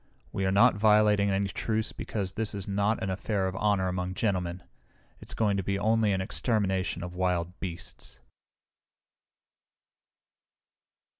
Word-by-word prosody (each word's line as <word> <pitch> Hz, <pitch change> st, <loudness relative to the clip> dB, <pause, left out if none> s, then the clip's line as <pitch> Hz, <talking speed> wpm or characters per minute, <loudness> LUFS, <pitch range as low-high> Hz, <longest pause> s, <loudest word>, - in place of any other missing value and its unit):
We 95 Hz, -1 st, -1 dB
are -, -, +2 dB
not 100 Hz, +2 st, +6 dB
violating 105 Hz, -1 st, +4 dB
any 100 Hz, 0 st, 0 dB
truce 110 Hz, +3 st, -1 dB
because 95 Hz, -4 st, -4 dB
this 110 Hz, 0 st, -2 dB
is 100 Hz, -2 st, -6 dB
not 100 Hz, +2 st, 0 dB
an 95 Hz, -, -1 dB
affair 100 Hz, +1 st, -1 dB
of 95 Hz, -, -4 dB
honor 100 Hz, -3 st, +1 dB
among 90 Hz, 0 st, -3 dB
gentlemen. 90 Hz, -4 st, -1 dB, 0.6 s
It's -, -, -6 dB
going 105 Hz, -3 st, +1 dB
to 95 Hz, -, -1 dB
be 100 Hz, +2 st, -1 dB
only 110 Hz, +1 st, +2 dB
an 95 Hz, -1 st, 0 dB
extermination 95 Hz, -4 st, -1 dB
of 90 Hz, 0 st, -6 dB
wild 90 Hz, -1 st, -1 dB
beasts!" 90 Hz, -3 st, -7 dB
100 Hz, 140 wpm, -28 LUFS, 95-105 Hz, 0.6 s, not